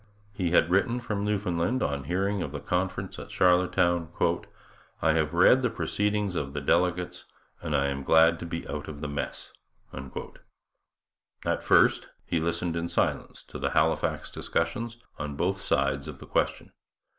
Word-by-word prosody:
He 95 -4 -1
had 85 0 +3
written 110 +6 +2
from 105 -4 -3
Newfoundland, 100 +2 0
on 70 -2 -2
hearing 95 +4 0
of 75 - -3
the 75 - -4
conference 90 +5 -2
at - - -9
Charlottetown: 90 -2 +3 0.9
'I 80 - +3
have 80 -1 +1
read 90 +9 +6
the 125 - +1
proceedings 105 -2 -1
of 70 -5 -3
the 75 - -2
delegates 90 +5 0 0.4
and 80 -3 -2
I 70 -1 +2
am 70 0 -2
glad 80 +3 +5
to 85 - -6
be 85 0 -5
out - - -5
of 75 -2 -8
the 75 - -3
mess.' 70 0 -5 0.4
At 65 0 -8
first - - +4 0.2
he 85 - 0
listened 85 +1 -1
in 85 0 -2
silence - - -1
to - - -9
the - - 0
Halifax - - +1
discussions 115 +8 -2 0.2
on 75 -1 -4
both 95 +6 -1
sides 70 -2 0
of 75 -3 -7
the - - -11
question. - - -1
85 Hz, 160 wpm, -28 LUFS, 75-95 Hz, 0.9 s, read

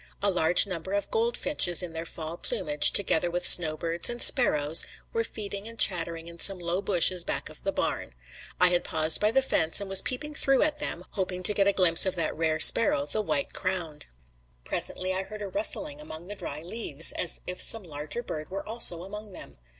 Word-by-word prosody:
A 200 - +1
large 175 -1 +5
number 185 0 -7
of 200 0 -4
goldfinches 230 - +2
in 170 -2 -8
their 165 +1 -8
fall 160 0 -8
plumage, 150 -3 +2
together 175 -3 +1
with 175 +1 -2
snowbirds 165 0 +3
and 240 0 -6
sparrows, 155 - +4 0.3
were 460 -1 -2
feeding 205 - -8
and 230 0 -11
chattering 170 -5 +2
in 170 0 -12
some 195 +2 +2
low 175 +2 -5
bushes 185 -2 +1
back - - -3
of - - -16
the - - -3
barn. - - -5 0.4
I 180 - +6
had 175 0 -1
paused 160 0 0
by 210 - +2
the 265 +4 0
fence 165 -10 -1
and 200 - -7
was 195 0 +5
peeping 300 +4 -3
through 270 -2 0
at 300 -1 -2
them, 180 - -4
hoping 185 -1 -6
to 210 - +6
get 200 -1 0
a - - +3
glimpse 180 -2 +4
of 190 - -3
that 165 -3 -4
rare 160 -1 -3
sparrow, 155 -4 +4
the 180 +9 -4
white 280 +6 -3
crowned. 175 -5 -5 0.6
Presently 185 0 -2
I 190 - -4
heard 210 +2 -10
a - - -6
rustling 300 - -1
among 170 - -11
the 205 - -7
dry 150 -5 -5
leaves 170 -5 -1
as 170 - -2
if 180 - -4
some 225 -2 +1
larger 155 +7 -7
bird 155 -8 -8
were 195 +1 -8
also 215 -7 +3
among 210 +1 -11
them. - - -12
185 Hz, 205 wpm, -25 LUFS, 165-210 Hz, 0.6 s, I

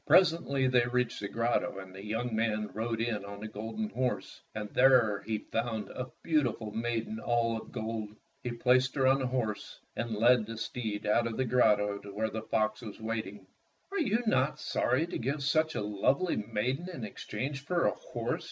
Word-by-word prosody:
Presently 165 -7 +4
they 125 -1 +4
reached 125 0 0
the 100 - -3
grotto, 115 0 0
and 95 -1 -8
the 95 +1 -9
young 110 +2 -2
man 110 -2 0
rode 115 +1 -2
in 115 -3 -1
on 100 0 -8
the 110 - -5
golden 110 - -4
horse, 125 - -2
and 105 -1 -3
there 125 -6 +5
he 110 -1 +1
found 110 0 -3
a 125 0 -5 0.2
beautiful 125 -9 +1
maiden 115 -1 -2
all 115 -1 +1
of 110 - -7
gold. 110 -1 -4 0.3
He 125 - -3
placed 125 +2 +3
her 135 -2 +2
on 135 +1 +5
the 130 - 0
horse 120 -5 -2 0.2
and 115 -1 -2
led 115 0 +5
the 115 0 -6
steed 110 -2 -3
out 115 +3 +3
of 115 - -4
the 130 - +1
grotto 105 -4 +3
to 100 - -10
where 110 +1 0
the 110 - -3
fox 110 -1 0
was 110 -3 -8
waiting. 110 -3 -4 0.5
"Are 400 - -1
you 235 -5 +2
not 140 -8 +2
sorry 130 +6 +1
to 175 - -4
give 140 +4 -1
such 155 +2 +2
a - - 0
lovely 130 - +1 0.2
maiden 130 +11 -1
in 150 -10 -6
exchange 130 +6 -4
for 170 +3 +1
a - - +4
horse?" - - -3
115 Hz, 195 wpm, -31 LUFS, 110-130 Hz, 0.5 s, there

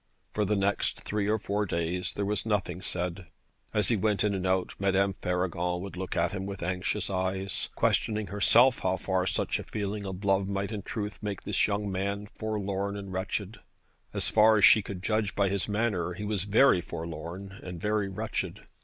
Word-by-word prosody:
For 105 - +1
the 105 +2 +1
next 100 0 0
three 105 -1 -1
or 110 - +3
four 105 0 -1
days 85 +1 -1
there 100 - -2
was 105 +1 -1
nothing 105 -4 -1
said. 90 -1 -3 0.4
As 105 - +2
he 115 - +4
went 105 0 +1
in 105 -1 +2
and 95 -1 -1
out 95 0 +1
Madame 100 0 +2
Faragon 90 -1 -1
would 95 0 -6
look 95 0 -4
at - - +2
him 95 -1 -4
with 100 -3 -5
anxious 90 +2 -1
eyes, 95 +1 -2
questioning 110 -2 +1
herself 115 +6 +4
how 95 0 0
far 95 0 0
such - - 0
a - - -5
feeling 100 -1 -3
of 95 +1 -6
love 95 0 +2
might 100 +1 -2
in 105 -2 -3
truth 105 +1 -4
make 105 -3 -4
this - - +2
young 105 -1 -1
man 100 +2 -2
forlorn 100 -2 -2
and 100 -2 -7
wretched. 100 +3 -3 0.5
As - - 0
far 110 0 +6
as 105 - +7
she 110 - +8
could 95 -2 -7
judge 110 -2 0
by 100 -1 +3
his 100 -1 0
manner 100 -5 0
he 100 +4 -6
was 105 -3 -1
very 105 -2 +5
forlorn 85 +5 -6
and 90 -2 -7
very 105 +1 0
wretched. 95 - -3
100 Hz, 195 wpm, -29 LUFS, 95-105 Hz, 0.5 s, she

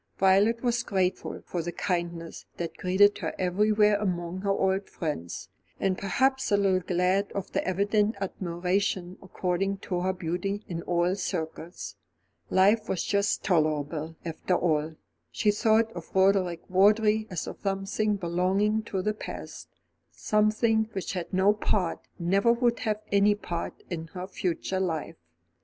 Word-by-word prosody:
Violet 200 +5 +4
was 240 -1 +1
grateful 190 -5 -1
for 175 - -3
the 175 +1 -4
kindness 170 -2 -3
that 170 -1 -4
greeted 195 +3 +3
her - - -3
everywhere 210 +3 +3
among 180 -3 -2
her 200 - -2
old 195 0 +1
friends, 150 - -4 0.3
and 190 -1 +1
perhaps 265 +7 +1
a 205 - +5
little 195 -2 +3
glad 185 +2 +1
of 200 - -4
the - - 0
evident 205 +3 +1
admiration 185 0 -2
accorded 190 +1 -2
to 180 - -2
her 185 +1 +1
beauty 185 +3 -3
in 170 -2 -4
all 175 +1 +1
circles. 170 -2 -5 0.5
Life 210 +4 +3
was 185 - 0
just 200 0 +1
tolerable, 155 -2 0
after 170 +2 -1
all. 160 -2 0 0.4
She 210 - +2
thought 220 +1 +3
of - - -9
Roderick 190 -3 +3
Vawdrey 210 +3 +4
as 180 -4 -3
of - - -8
something 195 +2 0
belonging 190 +4 +1
to 190 -4 -3
the 215 - +1
past; 215 - -8 0.4
something 220 +1 +1
which 190 0 -3
had 180 -3 -4
no 190 +2 +4
part, 195 -4 0 0.2
never 195 +6 +3
would 235 0 +1
have 215 -2 -2
any 200 +1 +4
part, 170 -4 -5
in 165 -2 -4
her 180 +1 -6
future 185 0 -2
life. 165 -5 -2
190 Hz, 145 wpm, -27 LUFS, 175-210 Hz, 0.5 s, a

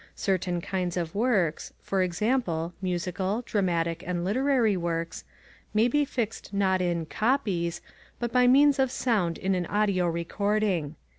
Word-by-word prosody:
Certain 180 -2 -1
kinds 180 -1 -2
of 165 -2 -2
works 200 -8 0
for 195 -1 -1
example, 180 -3 0
musical, 185 +4 -2
dramatic, 170 -6 0
and 175 -1 -2
literary 245 0 +2
works 170 -1 -3 0.5
may 220 +2 +4
be 290 +4 +2
fixed 230 -7 -4
not 190 -2 +1
in 170 -2 0
"copies" 185 - 0 0.4
but 240 -1 -3
by 250 -1 +5
means 280 +2 +5
of 265 -1 +3
sound 205 -10 0
in 190 +1 0
an 180 -2 -1
audio 200 -4 +1
recording. 175 -1 -1
190 Hz, 140 wpm, -27 LUFS, 175-225 Hz, 0.5 s, by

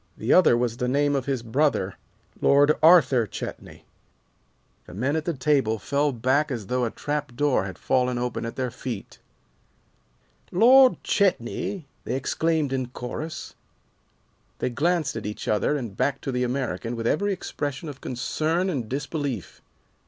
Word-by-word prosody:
The - - +1
other 170 -10 +6
was 120 -1 -1
the 125 - -1
name 145 +2 +2
of 135 -1 -2
his 135 -4 -1
brother, 115 -5 +1 0.5
Lord 145 +1 +5
Arthur 140 -8 +6
Chetney." - - -8 1.0
The 90 - -10
men 130 +8 0
at 160 -1 -2
the 170 - 0
table 130 -5 +1
fell 140 +7 0
back 130 +5 +1
as 120 -6 -4
though 125 +4 0
a - - -1
trapdoor 145 -4 -1
had 95 -2 -7
fallen 125 -1 +1
open 125 0 -2
at 115 - -5
their 130 -2 -2
feet. 120 -4 -7 1.3
"Lord 255 +7 +6
Chetney!" 190 - 0 0.2
they 125 - -2
exclaimed 155 +1 0
in 130 -2 -1
chorus. 145 +6 -6 1.0
They 125 - -2
glanced 155 +2 0
at 110 -2 -4
each 105 - -6
other 110 +8 +1
and 115 -8 -6
back 140 - 0
to 135 - -3
the 125 0 0
American 120 -4 -2
with 115 -1 -4
every 200 - +1
expression 145 -4 -4
of 140 -3 -8
concern 160 +8 -1
and 125 -9 -3
disbelief. 135 - -4
135 Hz, 150 wpm, -25 LUFS, 120-150 Hz, 1.3 s, other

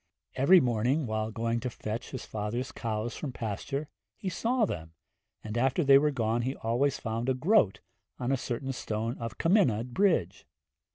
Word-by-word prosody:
Every 140 +8 +6
morning, 125 +3 +1
while 110 -1 -2
going 115 +1 -1
to 125 - -3
fetch 110 0 -5
his 130 - -6
father's 110 +5 -3
cows 115 0 -3
from 145 - -4
pasture, 135 +7 -4 0.3
he 190 - -3
saw 230 +6 +1
them, 80 - -6 0.5
and 110 0 -5
after 135 +7 +2
they 135 -1 +7
were 150 +1 +2
gone 115 -4 0
he 130 +3 -2
always 125 +5 0
found 115 +2 -2
a 130 - +2
groat 130 - +3 0.4
on 125 +1 -2
a - - +4
certain 130 +1 -3
stone 115 0 -3
of 115 -3 -5
Cymmunod 125 - +2
Bridge. 165 - +1
120 Hz, 170 wpm, -29 LUFS, 110-140 Hz, 0.5 s, they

